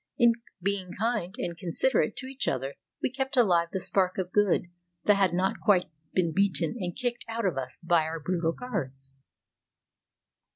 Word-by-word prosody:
In 235 -1 +6 0.3
being 195 -2 -1
kind 215 -3 -1
and 170 - -3
considerate 180 +10 +1
to 260 - -6
each 270 +1 -4
other 135 +1 -1 0.3
we - - +1
kept 265 +1 -2
alive 175 -8 +4
the 190 - -1
spark 185 0 +1
of 185 -1 -2
good 205 -3 +3 0.4
that 210 - +6
had 195 -3 +3
not 185 +2 0
quite 190 -4 +4 0.3
been 170 -3 +1
beaten 170 -5 +2
and 175 -3 -3
kicked 245 -1 -2
out 230 -1 -2
of 185 - +1
us 130 -1 -4
by 170 -2 +3
our 160 +1 -3
brutal 165 +1 0
guards. 135 - -4
185 Hz, 170 wpm, -28 LUFS, 170-215 Hz, 0.4 s, In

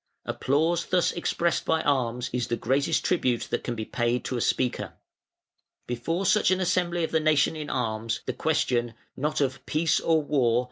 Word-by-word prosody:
Applause 160 +5 0
thus 180 -2 +2
expressed 170 0 0
by 160 0 +1
arms 125 -4 0
is 125 -1 -1
the 120 - 0
greatest 140 +7 0
tribute 125 -9 +1
that - - -1
can 120 - -3
be 110 -1 -4
paid 120 +1 -1
to 130 - -2
a 120 - -1
speaker". 125 +2 0 0.9
Before 165 +10 -2
such 210 +4 +4
an 185 0 +2
assembly 175 -1 0
of 160 - -2
the 160 - +3
nation 155 0 +2
in 150 -1 -5
arms, 115 -2 -2
the - - -2
question, 130 -7 0 0.2
not 150 +2 -1
of 130 -1 -1
Peace 160 +2 +2
or 160 -2 +2
War? 130 -5 +2
145 Hz, 180 wpm, -26 LUFS, 120-165 Hz, 0.9 s, such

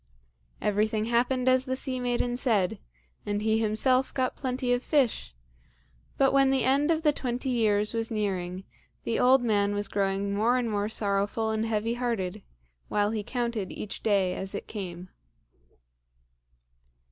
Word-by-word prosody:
Everything 215 +1 +1
happened 250 +2 +1
as 255 0 +4
the 260 -1 -1
sea 260 -1 -3
maiden 245 0 0
said, 220 -8 +1 0.4
and 205 0 -2
he 220 0 +2
himself 255 +4 +2
got 255 -1 -1
plenty 255 -1 -1
of 245 - 0
fish; 235 - 0 0.8
but 270 0 +3
when 275 -1 +5
the 265 -2 +2
end 280 +4 +2
of 325 -1 +1
the 300 - +5
twenty 255 -1 -3
years 210 -3 +2
was 225 0 -2
nearing, 190 -4 -2 0.4
the 230 - -1
old 255 0 +5
man 205 -3 +1
was 205 0 0
growing 195 0 -1
more 225 +5 +2
and 240 -3 -1
more 205 0 -1
sorrowful 205 +1 -1
and 220 +1 -1
heavy 225 +1 0
hearted, 230 -7 -2 0.5
while 205 0 +1
he 220 -1 -2
counted 235 -3 -3
each 210 - -6
day 195 -4 +2
as 190 +2 -5
it - - -5
came. 185 -4 -7
225 Hz, 155 wpm, -27 LUFS, 205-250 Hz, 0.8 s, when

